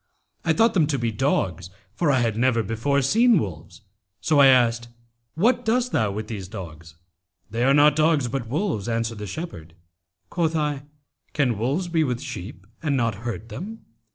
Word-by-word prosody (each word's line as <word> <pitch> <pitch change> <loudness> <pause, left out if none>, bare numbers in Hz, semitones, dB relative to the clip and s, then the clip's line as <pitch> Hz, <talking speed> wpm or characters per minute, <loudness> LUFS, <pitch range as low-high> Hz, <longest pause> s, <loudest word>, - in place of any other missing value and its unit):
I - - +2
thought 230 0 +3
them 165 -6 +3
to 145 -2 0
be 120 -2 -1
dogs, 95 - -1 0.2
for 165 +3 0
I 130 -2 +2
had 115 -3 0
never 115 -1 +2
before 120 +7 0
seen 230 - +4
wolves; 95 - -5 0.4
so 155 -2 +2
I 140 - +8
asked, 120 -2 +3 0.5
'What 235 +8 +2
dost 245 +2 +1
thou 110 -2 +1
with 105 +2 -4
these 100 -5 -6
dogs?' 80 -5 -10 0.6
'They 115 +3 0
are 135 - +4
not 150 0 +5
dogs, 155 -4 +2
but 120 -1 -4
wolves,' 140 - -2
answered 115 -1 -2
the 105 - -6
shepherd. 85 - -7 0.6
Quoth 165 -2 0
I, 145 -2 -1 0.5
'Can 135 -6 +1
wolves 135 - -1
be 165 -2 +1
with 125 -4 -2
sheep 90 -4 -8 0.2
and 145 -3 0
not 115 -3 +1 0.2
hurt 115 0 -6
them?' 195 - -8
130 Hz, 180 wpm, -24 LUFS, 110-155 Hz, 0.6 s, I